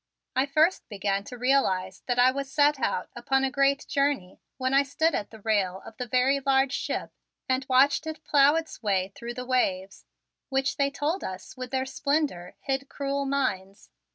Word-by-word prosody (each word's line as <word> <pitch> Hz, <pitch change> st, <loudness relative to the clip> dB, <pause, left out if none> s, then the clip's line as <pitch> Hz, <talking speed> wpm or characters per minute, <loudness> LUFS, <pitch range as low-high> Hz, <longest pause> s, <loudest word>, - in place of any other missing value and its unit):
I 265 Hz, +2 st, +2 dB
first 310 Hz, +6 st, +2 dB
began 200 Hz, -1 st, -1 dB
to 250 Hz, -, -8 dB
realize 195 Hz, -8 st, +1 dB
that 245 Hz, -1 st, 0 dB
I 250 Hz, +1 st, +6 dB
was 275 Hz, 0 st, -5 dB
set 290 Hz, -1 st, +3 dB
out 185 Hz, -6 st, -1 dB
upon 270 Hz, +3 st, +1 dB
a 265 Hz, -, +1 dB
great 275 Hz, +1 st, +2 dB
journey 275 Hz, -10 st, -1 dB, 0.2 s
when 260 Hz, 0 st, -1 dB
I 275 Hz, -, +6 dB
stood 315 Hz, +4 st, 0 dB
at 205 Hz, -, -2 dB
the 220 Hz, -1 st, -13 dB
rail 195 Hz, -4 st, 0 dB
of 225 Hz, -, -11 dB
the 250 Hz, -, -4 dB
very 255 Hz, +4 st, +2 dB
large 270 Hz, -1 st, +2 dB
ship -, -, -3 dB, 0.4 s
and 260 Hz, 0 st, 0 dB
watched 275 Hz, +4 st, +4 dB
it 315 Hz, 0 st, -6 dB
plow 285 Hz, +1 st, +5 dB
its 325 Hz, -1 st, -4 dB
way 195 Hz, -3 st, 0 dB
through 240 Hz, 0 st, -7 dB
the 250 Hz, -, -5 dB
waves 195 Hz, -7 st, -1 dB, 0.4 s
which 270 Hz, 0 st, 0 dB
they 280 Hz, 0 st, +2 dB
told 295 Hz, +6 st, -2 dB
us 185 Hz, +5 st, -7 dB
with 255 Hz, -1 st, -6 dB
their 265 Hz, 0 st, -1 dB
splendor 280 Hz, -, -1 dB
hid 270 Hz, 0 st, -2 dB
cruel 280 Hz, 0 st, -2 dB
mines. 200 Hz, -8 st, -2 dB
265 Hz, 185 wpm, -27 LUFS, 220-280 Hz, 0.4 s, I